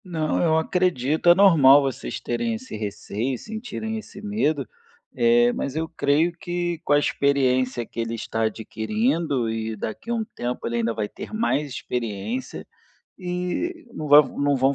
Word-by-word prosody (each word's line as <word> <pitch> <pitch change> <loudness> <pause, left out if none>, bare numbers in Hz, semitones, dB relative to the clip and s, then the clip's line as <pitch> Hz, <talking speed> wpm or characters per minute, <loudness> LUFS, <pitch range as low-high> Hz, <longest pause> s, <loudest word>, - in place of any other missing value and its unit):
Não, 160 -5 -1
eu 160 -2 +3
acredito. 160 -2 +1
É 175 - +8
normal 145 -8 +7
vocês 130 - -4
terem 120 -1 -2
esse 120 0 -8
receio, 110 +4 -3
sentirem 220 - -5
esse 200 - -12
medo, 160 - -1 0.5
eh, 120 0 +4
mas 140 - -3
eu 160 +1 -1
creio 160 +1 +1
que 175 -1 -2
com 145 - +2
a - - +6
experiência 130 -4 +1
que 115 - -9
ele 115 0 -2
está 115 0 -4
adquirindo, 130 - -1
e 110 0 -3
daqui 110 - -6
a 235 - +1
um 225 -1 -2
tempo 125 +1 -4
ele 120 0 -1
ainda 115 0 0
vai 105 -2 -2
ter - - -9
mais 185 -10 0
experiência, 115 -1 -4 0.5
e 180 - -3
não 155 - -5
va 145 +1 +10
não 145 0 -1
vão 135 +2 +2
140 Hz, 165 wpm, -24 LUFS, 120-175 Hz, 0.5 s, va